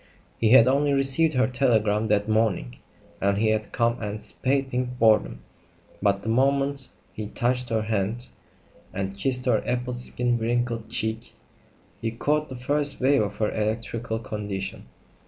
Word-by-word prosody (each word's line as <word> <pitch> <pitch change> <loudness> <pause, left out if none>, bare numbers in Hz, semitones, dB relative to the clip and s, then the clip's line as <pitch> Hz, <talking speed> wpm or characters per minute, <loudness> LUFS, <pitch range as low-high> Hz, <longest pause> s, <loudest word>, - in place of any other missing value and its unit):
He 110 - +3
had 125 0 +7
only 140 +2 +2
received 140 +3 +3
her 130 0 +3
telegram 110 -5 +1
that 105 -1 +1
morning, 110 - 0 0.4
and 100 0 +2
he 110 +1 +2
had 110 -1 -1
come 115 0 0
anticipating 125 +4 -2
boredom; 110 - +2 0.6
but 100 -1 +1
the - - -7
moment 135 +2 +1 0.2
he 105 -1 -5
touched 125 +3 -1
her 110 -1 0
hand 110 +2 -2 0.7
and 95 0 -3
kissed 125 +5 -1
her 120 -4 +2
apple 125 0 -2
skin 120 0 0
wrinkled 115 0 -1
cheek, 110 0 -1 0.7
he 115 - -1
caught 150 +6 -1
the 130 - -7
first 145 +3 -1
wave 135 0 +3
of 105 -1 -3
her 105 0 -1
electrical 110 +1 -2
condition. 100 - -5
115 Hz, 145 wpm, -25 LUFS, 105-130 Hz, 0.7 s, had